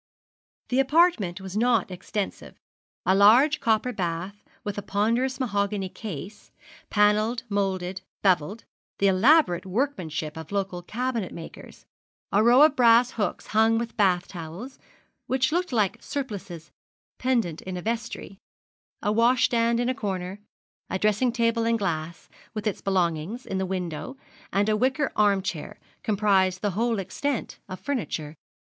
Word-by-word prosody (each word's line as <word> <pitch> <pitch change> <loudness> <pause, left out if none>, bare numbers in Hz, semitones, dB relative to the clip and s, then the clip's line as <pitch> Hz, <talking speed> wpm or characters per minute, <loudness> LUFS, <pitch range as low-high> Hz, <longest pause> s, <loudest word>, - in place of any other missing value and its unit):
The 255 - +2
apartment 270 - +3
was 190 0 -7
not 230 -3 +2
extensive. 195 +2 -5 0.5
A 190 - +4
large 240 +10 +6
copper 225 +2 +1
bath 180 +2 -4 0.2
with 205 -1 -3
a - - -5
ponderous 230 +8 0
mahogany 200 -5 -1
case, 200 0 -8 0.4
panelled, 215 +3 +2
moulded, 190 -2 -1 0.2
bevelled, 190 +3 +1 0.3
the 200 - +1
elaborate 200 - +4
workmanship 180 - -2
of 160 +1 -8
local 195 -3 -2
cabinet 230 +1 -3
makers; 165 - -11 0.5
a 205 - +4
row 240 +5 +7
of 305 -2 +5
brass 235 0 +5
hooks 210 - -2
hung 220 +1 +3
with 235 0 -4
bath 185 -4 +2
towels, 175 - -8 0.5
which 260 +1 +1
looked 355 +1 0
like 215 -6 0
surplices 200 - -6 0.5
pendent 230 -11 0
in 185 -1 -5
a - - -5
vestry; 230 -4 -4 0.6
a 210 - +1
washstand 235 0 +3
in 245 - 0
a 255 - +1
corner, 190 -4 -4 0.5
a 190 - -1
dressing 215 +5 +2
table 230 -1 +1
and 230 0 +2
glass, 170 -5 -3 0.3
with 215 0 -4
its 210 - -2
belongings, 185 +4 -1
in 190 - -3
the 190 - -1
window, 180 - -4 0.3
and 200 +1 +1
a 215 - +3
wicker 260 +5 +1
arm 200 -2 +3
chair, 160 -5 -5 0.2
comprised 195 -3 +2
the 205 - +1
whole 230 +4 0
extent 250 +7 -3
of 185 - -6
furniture. 195 - -3
210 Hz, 140 wpm, -26 LUFS, 185-235 Hz, 0.6 s, row